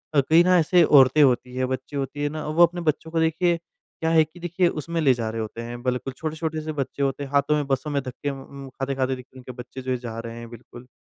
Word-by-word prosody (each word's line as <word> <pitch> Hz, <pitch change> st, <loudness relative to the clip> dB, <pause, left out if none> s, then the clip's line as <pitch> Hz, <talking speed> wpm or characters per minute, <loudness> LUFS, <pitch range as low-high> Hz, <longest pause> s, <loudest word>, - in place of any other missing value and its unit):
अ, 140 Hz, -, +6 dB
कई 165 Hz, +2 st, +7 dB
ना 180 Hz, 0 st, +4 dB
ऐसे 170 Hz, +2 st, +4 dB
औरतें 140 Hz, -1 st, +6 dB
होती 125 Hz, -1 st, +1 dB
हैं, 130 Hz, 0 st, 0 dB
बच्ची 130 Hz, +2 st, -5 dB
होती 140 Hz, +1 st, -3 dB
है 145 Hz, -, +1 dB
ना 155 Hz, +1 st, -5 dB
वो 155 Hz, +3 st, +4 dB
अपने 175 Hz, +1 st, -6 dB
बच्चों 160 Hz, 0 st, -1 dB
को 165 Hz, -, 0 dB
देखिए 165 Hz, +2 st, +2 dB
क्या 165 Hz, -1 st, -7 dB
है 165 Hz, -1 st, +5 dB
कि 155 Hz, +3 st, -13 dB
देखिए 175 Hz, +1 st, +1 dB
उसमें 170 Hz, +1 st, -3 dB
ले 135 Hz, -4 st, +5 dB
जा 115 Hz, -2 st, -3 dB
रहे 115 Hz, 0 st, -3 dB
होते 110 Hz, +1 st, -6 dB
हैं, 120 Hz, +1 st, -7 dB
बिल्कुल 125 Hz, +1 st, -2 dB
छोटे-छोटे 155 Hz, 0 st, -3 dB
से 155 Hz, 0 st, -4 dB
बच्चे 140 Hz, -1 st, -3 dB
होते 135 Hz, +1 st, -1 dB
हैं। 140 Hz, -, -8 dB
हाथों 140 Hz, +1 st, +2 dB
में, 150 Hz, -1 st, 0 dB
बसों 135 Hz, +1 st, -1 dB
में 140 Hz, -1 st, 0 dB
धक्के 130 Hz, +2 st, -5 dB
उम, 140 Hz, 0 st, -8 dB
खाते-खाते 135 Hz, 0 st, -2 dB
देख 125 Hz, -1 st, -11 dB
उनके 130 Hz, 0 st, -9 dB
बच्चे 125 Hz, +1 st, -9 dB
जो 130 Hz, 0 st, -1 dB
जा 120 Hz, -2 st, -7 dB
रहे 115 Hz, 0 st, -7 dB
हैं 115 Hz, 0 st, -9 dB
बिल्कुल, 120 Hz, +1 st, -13 dB
140 Hz, 255 wpm, -24 LUFS, 125-160 Hz, -, कई